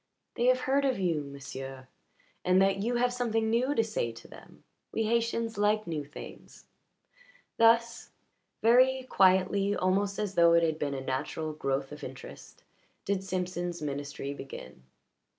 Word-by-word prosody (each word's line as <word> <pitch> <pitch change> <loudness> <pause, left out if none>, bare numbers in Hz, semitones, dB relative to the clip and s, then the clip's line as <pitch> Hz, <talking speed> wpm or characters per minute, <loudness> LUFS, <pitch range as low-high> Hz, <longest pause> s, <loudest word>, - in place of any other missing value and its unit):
"They 240 - -1
have 255 0 +4
heard 275 +2 +1
of 265 -4 +1
you, 170 -5 0
m'sieu' 135 -1 -8 0.6
and 185 +1 +4
that 195 0 +3
you 240 +4 0
have 245 +1 +2
something 225 -3 0
new 255 +5 +1
to 225 - +3
say 215 - -2
to 115 0 -13
them. - - -15 0.3
We 225 - -1
Haytians 230 0 0
like 210 +1 +2
new 160 -3 -3
things." 145 +1 -12 0.9
Thus, 230 +1 +3 0.5
very 255 +3 +5
quietly, 195 -2 +3
almost 195 +2 0
as 210 -2 -2
though 170 -2 +5
it 170 0 +5
had 160 -1 0
been 140 -1 -2
a 135 - -4
natural 145 +4 -3
growth 135 -2 -2
of 150 0 -9
interest, 130 0 -10 0.4
did 195 -1 -1
Simpson's 180 -2 -3
ministry 140 -1 -4
begin. 65 - -10
190 Hz, 150 wpm, -29 LUFS, 150-230 Hz, 0.9 s, very